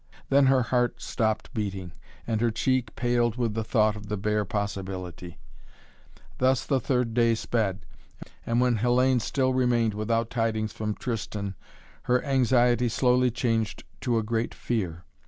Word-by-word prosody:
Then 140 0 +5
her 130 -1 +4
heart 120 +1 0
stopped 110 +2 -2
beating, 95 -6 -4 0.3
and 110 -2 -1
her 120 - +3
cheek 125 +1 0
paled 120 -2 +1
with 120 -3 -1
the 110 +1 -2
thought 110 -2 +2
of 105 -1 -9
the 105 0 -2
bare 105 +1 0
possibility. 95 -3 -5 1.0
Thus 130 0 +2
the 135 -3 +1
third 125 -2 0
day 115 -1 +3
sped, 105 -4 -1 0.6
and 115 +1 0
when 125 -2 +3
Hellayne 125 +2 +3
still 130 +2 0
remained 120 -3 +2
without 115 +2 -1
tidings 110 -2 -1
from 105 -1 -3
Tristan 105 -4 -4 0.5
her 125 0 +3
anxiety 125 -2 +3
slowly 125 +1 +3
changed 115 -2 -1 0.2
to 120 -3 0
a 110 - 0
great 115 +1 -2
fear. 90 -8 -3
115 Hz, 150 wpm, -27 LUFS, 105-125 Hz, 1.0 s, Then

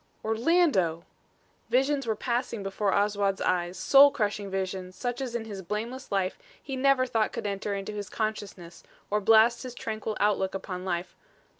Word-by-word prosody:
"Orlando!" 225 - +2 0.6
Visions 270 0 +1
were 220 - +1
passing 235 -2 -2
before 195 +1 -1
Oswald's 200 -1 +1
eyes, 175 0 0
soul 275 +8 +7
crushing 205 -5 -2
visions 190 -1 -4
such 245 +5 -3
as 250 -3 -4
in 230 -2 -3
his 200 -3 -7
blameless 220 +7 -5
life 195 -2 0 0.2
he 270 - -6
never 265 0 +3
thought 225 -3 0
could - - -5
enter 200 0 -2
into 200 +2 -5
his 205 -1 -5
consciousness 205 -6 -4 0.3
or 210 0 +1
blast 225 +3 +5
his 255 -2 -7
tranquil 220 -2 -4
outlook 195 -2 +1
upon 185 -1 -5
life. 175 -1 -3
210 Hz, 160 wpm, -28 LUFS, 195-240 Hz, 0.6 s, soul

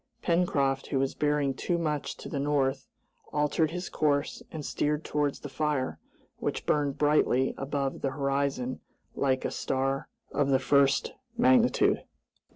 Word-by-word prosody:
Pencroft, 140 -6 +1
who 140 - -1
was 135 0 +1
bearing 145 -2 +1
too 170 +6 -1
much 150 -4 -2
to - - -8
the 140 - -3
north, 135 -2 0 0.4
altered 150 +2 +1
his 180 +3 -4
course 145 -1 0
and 155 -3 -6
steered 150 +1 0
towards 145 -1 0
the - - -5
fire, 145 -1 -1 0.4
which - - -3
burned 145 -1 +1
brightly 145 -3 +3
above 135 0 -2
the 135 - 0
horizon 140 -2 -1 0.3
like 130 -2 0
a - - -1
star 135 +1 -1 0.2
of 145 -1 +1
the 135 - +5
first 140 +1 +3 0.2
magnitude. 250 0 +4
145 Hz, 145 wpm, -29 LUFS, 135-150 Hz, 0.4 s, the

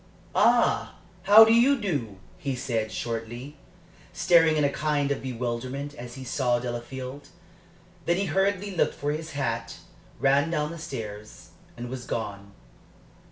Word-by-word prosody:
"Ah, - - +3 0.3
how 210 +3 +10
do 225 - +4
you 255 +4 +5
do?" 140 - -2 0.2
he 135 -2 -2
said, 115 -4 -2
shortly, 120 +5 -5 0.6
staring 165 -3 +4
in 150 - +2
a 140 - +3
kind 150 -2 0
of 140 - -1
bewilderment 130 +3 -4
as 120 -2 -9
he 135 - -8
saw 125 -1 +1
Delafield. 125 +3 -6 0.8
Then 175 - +3
he 200 - 0
hurriedly 195 +2 0
looked - - +1
for 145 +1 -2
his 155 +1 -5
hat, 115 -5 -3 0.4
ran 140 +4 +3
down 150 -2 -1
the 170 - -8
stairs, 110 -7 -7 0.3
and 120 +1 -5
was 125 -1 -6
gone. 100 -3 -4
135 Hz, 145 wpm, -26 LUFS, 120-160 Hz, 0.8 s, how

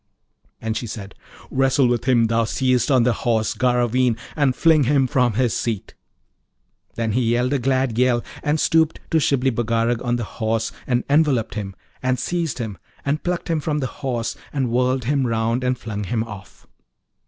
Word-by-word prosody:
And 110 -1 -3
she 120 - -3
said, 100 -3 -7 0.4
'Wrestle 135 0 +3
with 120 0 0
him 120 -3 +4
thou 115 +1 +2
seest 130 +3 +1
on 130 -4 +4
the 125 0 +3
Horse 110 0 0
Garraveen, 125 -1 +2 0.2
and 140 -4 +2
fling 160 -4 +4
him 135 0 +3
from 125 -2 +2
his 120 +1 +1
seat.' 115 -4 -3 1.0
Then 115 -1 -1
he 125 +5 +1
yelled 125 +3 +1
a 140 - +1
glad 130 -2 0
yell, 125 -2 +3 0.2
and 150 +1 0
stooped 160 0 +2
to 160 - +4
Shibli 135 -3 +2
Bagarag 115 0 0
on 120 -1 0
the 120 - -2
horse 110 0 -2 0.2
and 125 -1 +1
enveloped 140 -6 +2
him, 100 -3 -5 0.3
and 130 0 +1
seized 170 -2 -2
him, 110 -7 -5 0.3
and 145 +2 0
plucked 180 -1 -2
him 165 -2 0
from 150 0 -1
the 135 0 -5
Horse, 120 -4 -2 0.2
and 130 -5 -1
whirled 125 +1 +1
him 135 +1 +1
round, 115 +2 0
and 125 0 +1
flung 105 -3 -5
him 110 +2 -1
off. 105 -4 -11
125 Hz, 180 wpm, -22 LUFS, 115-135 Hz, 1.0 s, him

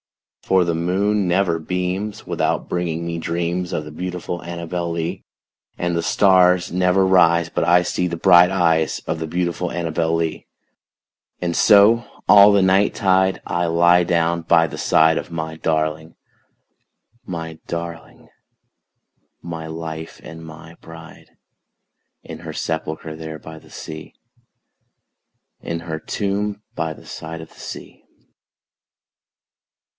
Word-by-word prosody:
For 95 -2 +2
the 85 - 0
moon 95 +4 0
never 90 -2 +1
beams 90 +5 -3
without - - -1
bringing 85 -2 -2
me 85 0 -3
dreams 85 +2 -2
Of 75 - -3
the 75 - -9
beautiful 90 +1 -5
ANNABEL 85 0 -4
LEE; 85 0 -4 0.5
And 85 -1 -1
the 85 - 0
stars 90 -1 +3
never 90 +1 +3
rise 85 -3 +4
but - - -1
I 90 +1 +4
see 90 0 -1
the 85 -1 -4
bright 90 0 +6
eyes 85 -4 +1
Of 80 0 -3
the 80 - -4
beautiful 90 +1 -2
ANNABEL 80 -1 -1
LEE; 80 -1 -3 0.9
And 85 -1 -2
so, 110 +3 +5 0.2
all 100 0 +8
the 100 -1 +4
night 95 +2 +3
tide, 95 0 +2
I 85 0 -1
lie 85 +1 +4
down 85 -1 +1
by 85 0 +4
the 80 - -7
side 80 0 +3
Of - - -9
my 80 -1 -4
darling, 80 0 -2 1.1
my 80 -4 -6
darling, 85 0 -7 1.2
my 80 -2 -6
life 80 0 -7
and 80 0 -10
my 80 +1 -12
bride, 80 0 -13 0.9
In - - -9
her - - -8
sepulchre 80 -1 -4
there 80 -1 -8
by 80 0 -11
the - - -20
sea 80 0 -9 1.5
In 85 0 -4
her 80 -2 -5
tomb 105 +3 -3
by 80 -1 -2
the - - -16
side 80 +1 -7
of 80 - -10
the - - -19
sea. - - -9
85 Hz, 135 wpm, -20 LUFS, 80-90 Hz, 1.5 s, all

